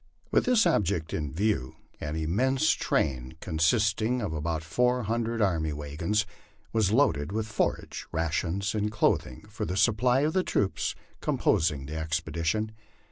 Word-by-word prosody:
With - - +3
this 245 -3 +4
object 85 -5 +1
in 75 -3 -2
view 90 - -1 0.2
an 75 +1 -4
immense 110 +13 +2
train, 65 -1 -1
consisting 105 +9 +1
of 100 -8 -3
about 80 +1 -2
four 125 +9 +1
hundred 115 +1 0
army 80 -6 +1
wagons, 80 +9 -1 0.5
was 110 -3 +2
loaded 85 - +2
with 110 +1 -1
forage, 110 - -2
rations, 85 +5 -1
and 105 -1 -1
clothing, 85 -11 0
for - - -6
the 90 - -2
supply 125 +5 +3
of 155 +2 +1
the 185 - +3
troops 100 - -1 0.3
composing 75 -4 +1
the 75 +3 -5
expedition. 80 +6 -1
95 Hz, 140 wpm, -28 LUFS, 80-110 Hz, 0.5 s, this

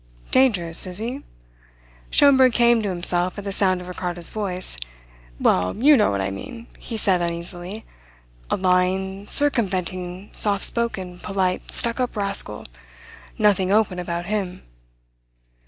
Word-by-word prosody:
"Dangerous, 185 -11 +3
is 180 -1 -5
he?" 240 +6 -4 0.9
Schomberg 265 -3 +5
came 235 -1 +4
to 205 - -2
himself 175 0 0
at 205 - -6
the 200 - -4
sound 185 -2 +1
of 180 - -10
Ricardo's 175 -2 -4
voice. 185 -4 -2 0.6
"Well, 90 0 +1
you 290 +6 +6
know 215 - +3
what 100 -1 -1
I 95 0 -2
mean," 230 - -8
he 230 - -6
said 190 -4 +2
uneasily. 175 +4 -5 0.6
"A - - 0
lying, 190 +2 0
circumventing, 185 -8 -1
soft 200 -2 +1
spoken, 190 -7 -2
polite, 190 -2 -2
stuck 235 +1 +4
up 250 -3 -2
rascal. 200 - -1 0.7
Nothing 195 -3 +2
open 205 -4 +2
about 170 0 -4
him." 195 -2 -3
190 Hz, 135 wpm, -22 LUFS, 180-220 Hz, 0.9 s, you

